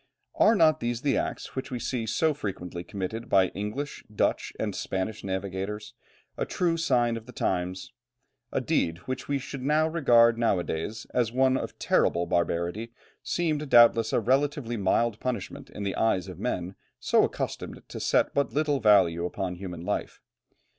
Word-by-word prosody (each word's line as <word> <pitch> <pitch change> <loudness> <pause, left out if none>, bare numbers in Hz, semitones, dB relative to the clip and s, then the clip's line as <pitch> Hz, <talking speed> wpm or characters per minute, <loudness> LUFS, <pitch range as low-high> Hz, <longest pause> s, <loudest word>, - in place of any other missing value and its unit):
Are 225 - +5
not 155 -4 +4
these 120 +2 -3
acts, 140 - -1
which 130 0 -4
we 125 - -3
see 120 -1 -3
so 155 +8 +2
frequently 90 -8 -5
committed 100 +5 -5
by 95 -2 +4
English, 105 +9 -5
Dutch, 105 - 0
and - - -1
Spanish 95 +3 -3
navigators, 95 +2 -4 0.5
a - - +1
true 170 -2 0
sign 120 -8 +1
of 115 +1 -10
the - - -9
times? 90 -4 -2 0.6
A - - 0
deed 80 0 0
which 130 0 -4
we 140 - +1
should 135 0 -7
regard 140 -6 +4
now 115 -5 +3
a 90 - -1
days 105 +9 -4
as 120 -3 +1
one 130 +1 +3
of - - -4
terrible 85 +1 +2
barbarity 85 +7 -1 0.3
seemed, 155 -4 -1
doubtless, 115 -2 +6
a - - +3
relatively 135 0 0
mild 110 +2 +1
punishment 125 -6 -4
in 105 - -7
the 100 -1 -2
eyes 95 -5 +1
of 90 -2 -9
men 95 -5 -2 0.3
so - - +3
accustomed - - -4
to - - -6
set - - +2
but 140 - +1
little 145 -1 +1
value 95 -6 +4
upon 90 +1 -3
human 90 -2 -7
life. - - -3
115 Hz, 165 wpm, -27 LUFS, 95-135 Hz, 0.6 s, doubtless